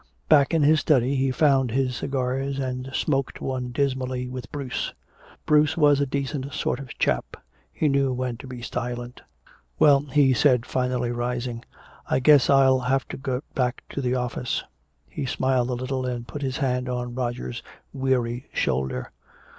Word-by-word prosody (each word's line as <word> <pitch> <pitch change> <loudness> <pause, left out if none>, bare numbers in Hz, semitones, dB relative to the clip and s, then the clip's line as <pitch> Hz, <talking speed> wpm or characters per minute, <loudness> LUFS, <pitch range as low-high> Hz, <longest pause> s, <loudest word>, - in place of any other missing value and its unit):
Back 145 -3 +5
in 160 - +3
his 155 +2 +5
study 135 -3 +2
he 135 0 +1
found 135 -1 +3
his 130 +1 0
cigars 135 +1 -2
and 130 -1 -3
smoked 135 0 -1
one 130 -2 -3
dismally 130 -1 -1
with 125 0 -7
Bruce. 140 -4 -3 0.5
Bruce 150 0 +3
was 145 -3 +5
a 140 - +1
decent 140 +1 -3
sort - - -1
of 135 -3 -9
chap. 60 - 0 0.3
He 155 - 0
knew 140 -1 +2
when 125 -1 -2
to 130 - -10
be 125 -2 -8
silent. 120 +1 -5 0.6
"Well," 140 -2 +6
he 140 -1 +3
spoke 125 -2 +3
finally, 125 -1 -1
rising, 120 0 -3 0.5
"I - - +2
guess 145 0 +5
I'll 135 -1 +5
have 130 +1 0
to - - -5
get 135 0 -3
back 125 -1 -1
to 140 - -4
the 125 -1 0
office." 125 0 -2 0.4
He 140 - -5
smiled 130 -1 +1
a - - -1
little 130 +1 -3
and 120 -1 -4
put 145 - -7
his 130 -2 -2
hand 125 -3 -1
on 125 -1 -3
Roger's 120 -1 -3 0.3
weary 130 -2 -1
shoulder. 65 0 -1
130 Hz, 165 wpm, -25 LUFS, 125-140 Hz, 0.6 s, Well